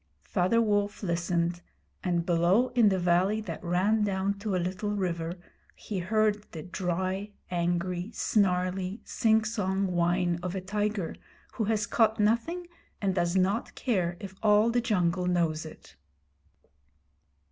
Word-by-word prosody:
Father 185 +6 +1
Wolf 205 -2 0
listened, 170 -1 0 0.4
and 175 -2 0
below 180 +8 +3
in 240 -4 +4
the 190 - +1
valley 180 +4 +2
that 190 -1 -7
ran 190 +5 +2
down 195 -1 0
to 205 -2 -2
a - - +2
little 185 +4 -2
river, 175 -4 -2 0.4
he 200 -3 -5
heard 210 +2 +1
the 160 -2 -6
dry, 185 +3 -2 0.2
angry, 175 +2 -1
snarly, 185 -1 0
singsong 215 -3 +1
whine 175 -1 +1
of 180 +1 -4
a - - -1
tiger 205 -2 -2 0.4
who 220 - -1
has 215 0 +1
caught 220 0 +2
nothing 235 +12 +1 0.3
and 195 -2 0
does 175 -1 0
not 195 +5 +1
care 180 -8 0
if 195 -1 -8
all 215 +1 +4
the 240 +1 +2
jungle 180 -5 +1
knows 165 -3 0
it. 155 - -14
190 Hz, 135 wpm, -28 LUFS, 175-210 Hz, 0.4 s, in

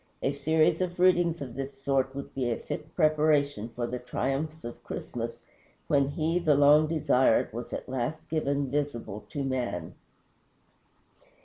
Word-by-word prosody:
A 135 - +2
series 155 +4 +2
of 180 -1 -2
readings 175 -4 +3
of 125 -4 -8
this 135 +1 -6
sort 135 -1 0
would 140 - -7
be 130 -3 -1
a 115 - 0
fit 155 0 -7
preparation 150 - +2
for 120 +1 -3
the 125 +1 -4
triumphs 135 +5 -3
of 120 - -8
Christmas, - - -5 0.4
when 140 -2 +3
he, 160 +4 0
the 155 -4 +3
long 145 +2 +6
desired, 130 -8 +2
was 120 +1 -6
at - - -5
last 130 +4 -3
given 140 -4 -1
visible 120 -8 -3
to 145 - -3
man. 125 -11 -2
140 Hz, 150 wpm, -28 LUFS, 130-155 Hz, 0.4 s, long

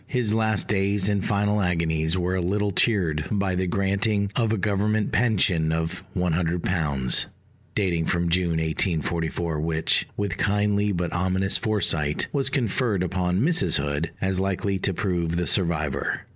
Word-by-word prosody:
His 120 -5 0
last 110 -2 +1
days 100 -1 +1
and 100 -2 0
final 105 0 +1
agonies 85 -2 0
were 90 0 -1
a 95 - 0
little 100 +3 0
cheered 90 -8 +1
by 100 -3 0
the 90 0 -1
granting 100 +2 0
of 115 -3 +1
a 110 - +1
Government 105 +2 0
pension 95 -9 +2
of 80 0 -2
£100, 85 -5 0 0.5
dating 85 -5 0
from 85 +1 0
June 85 -1 +1
1844, 80 0 -1
which, 80 0 +1
with 100 -4 -2
kindly 105 0 +1
but 90 -2 -2
ominous 95 +2 +1
foresight, 80 -9 0
was 135 -2 0
conferred 115 -6 0
upon 90 +1 0
Mrs. 130 - +2
Hood, 75 +3 -2
as 95 -1 0
likely 95 +1 -1
to 95 - 0
prove 85 -3 -1
the 90 0 0
survivor. 80 -8 0
95 Hz, 145 wpm, -24 LUFS, 85-105 Hz, 0.5 s, pension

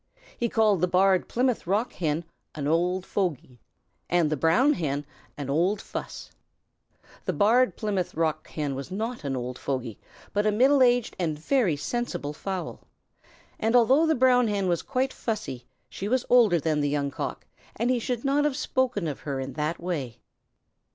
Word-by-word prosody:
He 235 - -1
called 215 -6 +3
the 180 - +3
Barred 185 +1 +3
Plymouth 250 -5 0
Rock 210 +6 0
Hen 160 -1 -1 0.3
"an 145 -2 -3
old 180 +4 +1
fogy," 150 -10 -3 0.5
and 170 -3 +2
the - - +2
Brown 195 - +3
Hen 145 - -2 0.3
"an 145 -2 -5
old 175 +9 +1
fuss." - - -7 0.9
The - - 0
Barred 235 +5 +3
Plymouth 200 -5 -2
Rock 155 -1 -1
Hen 145 -3 -3
was 135 +3 -6
not 220 +3 -4
an 140 -2 -2
old 125 0 -5
fogy, 130 -5 -3 0.3
but 205 +1 +1
a - - +4
middle 265 +6 +4
aged 245 -2 +3
and 160 -4 -1
very 195 - +1
sensible 175 -3 -3
fowl, 190 +3 -5 0.8
and 225 +2 +1
although 265 +7 +5
the 315 - +3
Brown 250 -1 +4
Hen 200 -2 0
was 175 -1 +1
quite 260 0 -1
fussy, 205 - -4 0.2
she 195 - -6
was 255 +3 +1
older 225 -9 +6
than 155 -1 0
the 145 - +1
Young 140 -1 -1
Cock, 130 - -5 0.3
and 235 +3 0
he 250 - +1
should 240 +2 -3
not 280 +2 +2
have 295 -2 0
spoken 250 - 0
of 145 - -4
her 140 -2 -4
in 135 0 -5
that 155 +2 -2
way. 145 -10 -4
185 Hz, 175 wpm, -26 LUFS, 150-240 Hz, 0.9 s, older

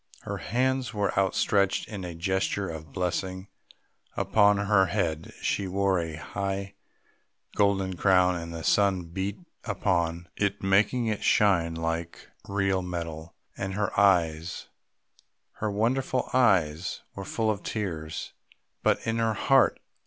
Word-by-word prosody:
Her - - -4
hands 130 +1 -1
were 100 -1 0
outstretched 95 0 +2
in 100 -4 -6
a 90 -2 -6
gesture 95 +3 -1
of 80 -3 -7
blessing; 95 +1 -3 0.7
upon 105 -1 +4
her 100 -1 +3
head 85 -4 -2
she 100 - 0
wore 95 0 +1
a 80 -2 -4
high 100 +4 -4 0.8
golden 95 -2 +2
crown, 90 -1 +4
and 85 -1 -5
the 85 -1 -6
sun 100 -3 +3
beat 95 +4 -4 0.3
upon 85 -5 -1
it 100 -1 -1
making 105 +6 +3
it 110 -2 -1
shine 85 -5 +3
like 80 +1 -4 0.2
real 95 -1 +1
metal; 85 -3 -6 0.2
and 95 0 -4
her 100 -1 0
eyes, 85 -4 +2 0.9
her 110 - -1
wonderful 125 +5 0
eyes, 95 -8 +2
were 100 - -6
full 110 +3 0
of 100 -2 -4
tears.... 80 -7 -4 0.5
But - - +1
in 115 0 0
her 115 -1 +1
heart.... - - +3
95 Hz, 130 wpm, -27 LUFS, 85-100 Hz, 0.9 s, upon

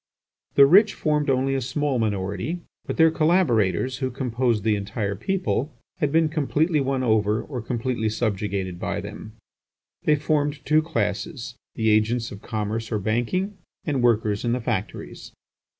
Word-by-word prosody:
The 140 - +9
rich 195 +8 +6
formed 150 -2 0
only 135 +1 +2
a 135 - 0
small 135 +1 -1
minority, 100 - -2 0.3
but - - -3
their 160 0 +6
collaborators, 130 - +2
who 130 -1 -1
composed 120 -3 -1
the 110 -1 +2
entire 100 0 -3
people, 160 - -1 0.2
had 150 - +1
been 160 +1 +4
completely 155 +1 +1
won 135 -1 0
over 110 -2 +2
or 130 -5 -5
completely 120 -1 -1
subjugated 100 -4 -2
by - - -2
them. 110 - -8 0.7
They 150 - +5
formed 145 -1 -1
two 155 +1 +4
classes, 115 -1 -3 0.2
the 110 -2 +2
agents 115 +2 +1
of 100 - -9
commerce 110 +1 -3
or 110 - +1
banking, 120 - -1 0.3
and 140 -5 0
workers 110 -4 +2
in 120 -1 +1
the 125 - 0
factories. 115 -5 -4
120 Hz, 150 wpm, -24 LUFS, 110-150 Hz, 0.7 s, The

